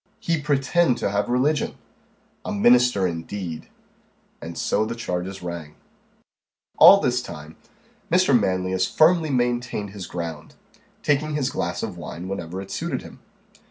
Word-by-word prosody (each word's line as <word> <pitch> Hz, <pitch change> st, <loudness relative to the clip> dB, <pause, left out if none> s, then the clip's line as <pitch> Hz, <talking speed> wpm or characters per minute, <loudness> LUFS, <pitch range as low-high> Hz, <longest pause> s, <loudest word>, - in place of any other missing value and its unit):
"He 165 Hz, -2 st, -1 dB
pretend 145 Hz, 0 st, +2 dB
to 100 Hz, -, -1 dB
have 100 Hz, 0 st, -1 dB
religion!" 135 Hz, +5 st, +1 dB, 0.7 s
"A -, -, -4 dB
minister 120 Hz, -1 st, +4 dB
indeed!" 85 Hz, 0 st, -5 dB, 0.7 s
And 85 Hz, 0 st, -7 dB
so -, -, +1 dB
the 110 Hz, -, -4 dB
changes 95 Hz, -4 st, -4 dB
rang. 85 Hz, -4 st, -6 dB, 1.0 s
All -, -, +10 dB
this 125 Hz, 0 st, 0 dB
time, 75 Hz, -7 st, -10 dB, 0.6 s
Mr. 180 Hz, -4 st, +4 dB
Manlius 95 Hz, -3 st, +1 dB
firmly 160 Hz, 0 st, +3 dB
maintained 120 Hz, -5 st, -1 dB
his 100 Hz, -3 st, -7 dB
ground, 85 Hz, -3 st, -6 dB, 0.5 s
taking 150 Hz, +1 st, +1 dB
his 140 Hz, -2 st, 0 dB
glass -, -, -3 dB
of -, -, -5 dB
wine 90 Hz, +2 st, -7 dB
whenever 95 Hz, -2 st, -5 dB
it 95 Hz, -, -12 dB
suited 155 Hz, -, -3 dB
him. -, -, -13 dB
105 Hz, 135 wpm, -23 LUFS, 90-135 Hz, 1.0 s, All